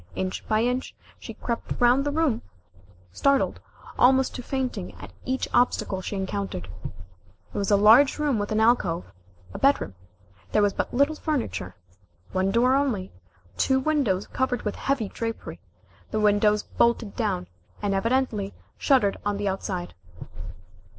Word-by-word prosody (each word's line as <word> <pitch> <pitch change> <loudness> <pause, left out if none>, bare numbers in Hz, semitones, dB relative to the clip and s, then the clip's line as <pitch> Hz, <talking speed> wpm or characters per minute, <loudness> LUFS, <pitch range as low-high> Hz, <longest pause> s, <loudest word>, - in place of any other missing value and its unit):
Inch 95 0 -3
by 215 +1 +2
inch, 250 +2 -1 0.2
she - - -9
crept 235 -1 -4
round 245 +3 +4
the 290 - 0
room, 300 -6 +1 0.7
startled 275 - +1 0.4
almost 260 +1 +4
to - - -5
fainting 260 0 -3
at - - -11
each 260 +1 -1
obstacle 200 -6 +2
she 200 - -5
encountered. 190 - -4 0.8
It - - -5
was 200 - -1
a 205 - +5
large 225 +7 +6
room 290 -7 +1
with 205 +1 -3
an 215 - +1
alcove 190 - +2 0.4
a - - -6
bedroom. 275 - +2 0.6
There 210 - +4
was 205 -1 +2
but - - -2
little 280 +4 +3
furniture, 260 - -3 0.6
one 190 +1 +1
door 240 +5 +3
only, 255 -9 0 0.5
two 265 -1 +3
windows 265 -10 +1
covered 260 -2 -1
with 210 - -2
heavy 270 -6 -1
drapery, 225 +2 -5 0.5
the 215 - -1
windows 210 0 +3
bolted 235 -3 +1
down, 90 - -1 0.3
and 205 -1 -1
evidently 220 -1 0 0.2
shuttered 255 -8 +3
on 205 0 -1
the 205 0 -2
outside. 190 -2 -3
225 Hz, 145 wpm, -25 LUFS, 200-265 Hz, 0.8 s, large